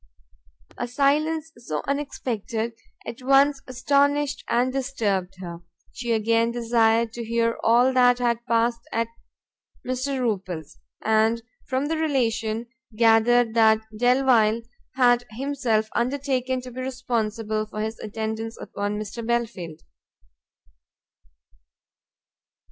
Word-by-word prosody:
A 245 - -2
silence 300 +5 +1
so 155 -11 -4
unexpected 235 -5 -3 0.3
at 235 - -7
once 275 +1 +4
astonished 280 +3 +1
and 250 +2 +2
disturbed 210 -9 -1
her; 170 -2 -7 0.3
she 240 -1 -4
again 230 +1 +2
desired 230 -1 +2
to 235 - -5
hear 230 0 0
all 245 +3 +4
that 245 -1 +5
had 235 -1 0
passed 230 0 +1
at 230 0 -1 0.8
Mr. 255 +2 -2
Rupil's, 185 - -3 0.3
and 220 +1 +2 0.2
from 260 +2 0
the 320 +2 -1
relation 235 -7 0 0.3
gathered 230 +1 +4
that 220 -1 +5
Delvile 240 -2 +3 0.3
had 245 -2 +4
himself 255 -6 0
undertaken 260 0 0
to 250 0 -9
be 255 +2 -6
responsible 225 -4 -2
for 215 0 -5
his 220 +1 -4
attendance 220 +1 -4
upon 205 +1 -4
Mr. 215 +2 -6
Belfield. 225 -9 -2
235 Hz, 110 wpm, -24 LUFS, 220-255 Hz, 0.8 s, that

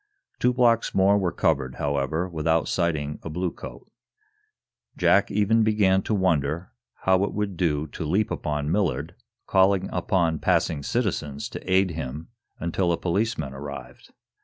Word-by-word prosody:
Two 125 - +3
blocks 120 -2 +2
more 95 +1 +5
were 90 -3 0
covered, 70 -7 0
however, 70 +4 -1
without 80 -1 0
sighting 75 -4 -1
a - - -7
bluecoat. 90 +2 -5 1.1
Jack - - +4
even 105 +2 +2
began 105 -3 +3
to 110 - -1
wonder 85 -3 0 0.3
how 95 0 +3
it 100 - -2
would 105 -2 -2
do 80 -4 0
to 80 - -7
leap 95 +7 0
upon 75 -1 -2
Millard, 80 -5 0 0.3
calling 95 0 +3
upon 85 -3 +1
passing 75 -3 +1
citizens 75 - -2
to 95 - -7
aid 95 -1 +3
him 80 0 -6 0.3
until 85 +2 0
a 85 - +1
policeman 90 -6 -1
arrived. 70 +1 -9
85 Hz, 140 wpm, -25 LUFS, 75-95 Hz, 1.1 s, more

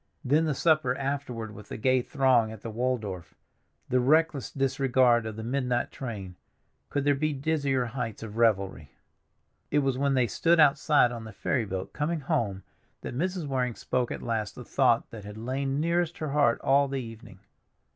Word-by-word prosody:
Then 150 +5 +3
the 150 -3 0
supper 155 -5 +2
afterward 135 -6 -4
with 105 0 -12
the - - -5
gay 130 +3 +2
throng 125 -5 +2
at 110 -2 -10
the 115 - -6
Waldorf—the 115 0 -4
reckless 150 +1 +2
disregard 130 -3 +2
of 110 - -6
the 110 - -6
midnight 125 0 -1
train—could 110 +4 -7
there 145 0 +4
be 155 +2 0
dizzier 140 -3 0
heights 115 -3 -5
of 110 -1 -8
revelry? 100 -9 +1 0.8
It 150 - +1
was 135 -1 0
when 140 -1 +2
they 125 -2 +3
stood 165 - +2
outside 145 -3 +5
on 115 -2 -6
the 110 - -8
ferry 115 +3 -1
boat 95 -2 -5
coming 155 +2 -1
home 115 - -1 0.4
that - - -6
Mrs. 180 +3 -2
Waring 125 -4 -1
spoke 125 -2 -1
at - - -5
last 110 -4 -2
the - - -9
thought - - +2
that 110 -3 -9
had 105 +1 -9
lain 135 +4 -2
nearest 170 +1 0
her 155 - -3
heart 140 -5 +3
all 140 +1 +3
the 135 0 -3
evening. 115 -4 -10
130 Hz, 175 wpm, -28 LUFS, 115-140 Hz, 0.8 s, outside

